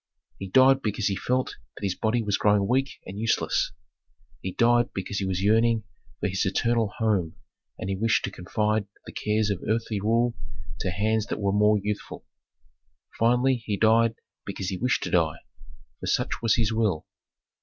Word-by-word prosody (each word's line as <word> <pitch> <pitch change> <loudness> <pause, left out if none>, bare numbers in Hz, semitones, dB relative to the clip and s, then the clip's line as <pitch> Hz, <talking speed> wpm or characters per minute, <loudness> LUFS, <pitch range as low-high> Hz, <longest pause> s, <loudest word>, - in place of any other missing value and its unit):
He 95 - -5
died 130 +4 +5
because 105 -2 -1
he 100 - -1
felt 125 +5 -1 0.2
that - - -10
his 95 - 0
body 115 +4 0
was 105 -2 +1
growing 105 -1 +3
weak 135 +3 0
and 100 +2 -7
useless. 115 0 +1 0.7
He 95 - -3
died 120 +3 +3
because 95 +1 -3
he 95 - -2
was 95 0 -1
yearning 115 +1 +3 0.4
for - - 0
his 95 -1 -1
eternal 115 +2 +1
home 100 -8 0 0.4
and - - -5
he 100 - -1
wished 110 +3 +1
to 100 - -5
confide 105 +3 -1 0.2
the - - -9
cares 105 0 0
of 95 - -3
earthly 110 -1 -1
rule 115 +3 +2 0.5
to - - -1
hands 110 +4 0
that - - -3
were 100 -1 +1
more 105 +1 +4
youthful. 105 +1 -5 0.9
Finally 125 +3 +3
he 110 -3 -3
died 115 +1 +4 0.3
because 95 -1 -4
he 95 - -3
wished 125 +5 0
to - - -4
die, 80 -3 +2 0.6
for - - -6
such - - 0
was 115 -2 +3
his 115 -2 +1
will. 105 -8 0
105 Hz, 175 wpm, -26 LUFS, 100-115 Hz, 0.9 s, died